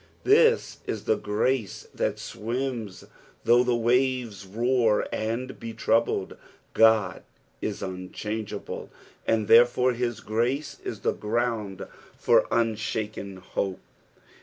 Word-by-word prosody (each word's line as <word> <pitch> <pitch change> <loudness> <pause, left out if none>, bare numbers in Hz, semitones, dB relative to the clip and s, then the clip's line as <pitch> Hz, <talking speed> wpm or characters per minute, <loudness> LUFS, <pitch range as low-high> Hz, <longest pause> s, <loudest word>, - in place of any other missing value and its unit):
This 460 +3 +4
is 110 -1 -3
the 110 - +2
grace 105 +2 -1
that - - -1
swims, 115 -3 -4 0.4
though 120 +1 +5
the 125 -1 +1
waves 120 -4 0
roar 115 +1 +2
and 115 +4 -3
be 115 -1 -6
troubled. 110 -3 +1 0.4
Oud 110 -4 +4 0.4
is 105 -2 -3
unchangeable, 100 +3 -5 0.4
and 110 -2 +1
therefore 120 +2 +5
his 120 -1 -2
grace 120 +7 -1
is - - -5
the - - +1
ground 110 -3 -2 0.3
for - - +4
unshaken 110 -3 -2
hope. 95 +1 -3
115 Hz, 110 wpm, -26 LUFS, 105-125 Hz, 0.4 s, though